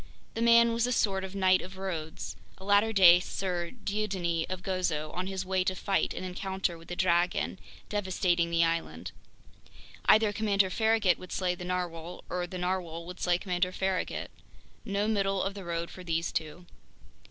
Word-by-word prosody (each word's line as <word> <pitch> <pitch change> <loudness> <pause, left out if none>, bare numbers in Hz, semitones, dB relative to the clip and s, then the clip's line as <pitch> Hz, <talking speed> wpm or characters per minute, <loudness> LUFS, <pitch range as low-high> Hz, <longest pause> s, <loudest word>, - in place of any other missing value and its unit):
The 225 - -3
man 235 0 +6
was 230 +1 +1
a - - -1
sort 195 -5 +1
of 190 0 -6
Knight 185 -1 +4
of 190 +1 -9
Rhodes, 170 -5 -5 0.2
a 190 - -13
latter 205 +2 +4
day 180 -4 +8
Sir 180 -2 -3 0.2
Dieudonné 190 -5 -1
of 185 0 -4
Gozo, 180 -5 -1
on 180 +1 -3
his 190 -1 -3
way 185 0 +1
to 185 0 -1
fight 195 +1 0
an - - -5
encounter 190 0 -2
with 165 0 -14
the 175 - -5
dragon 180 +1 +1 0.3
devastating 185 -4 0
the 170 0 +3
island. 90 - -2 0.9
Either 215 -1 +5
Commander 200 -2 +2
Farragut 220 -4 +2
would 185 - -11
slay 180 -2 0
the 180 0 -7
narwhale, 175 -1 -4
or 180 0 -1
the 185 - -6
narwhale 180 -2 -2
would 180 +1 -9
slay 175 -1 +2
Commander 180 -1 -1
Farragut. 190 0 -2 0.5
No 200 -1 -1
middle 195 -3 +1
of 195 - -2
the 200 -1 -8
road 170 -1 -3
for 185 - -10
these 165 0 -1
two. 160 +2 -4
185 Hz, 175 wpm, -29 LUFS, 175-195 Hz, 0.9 s, day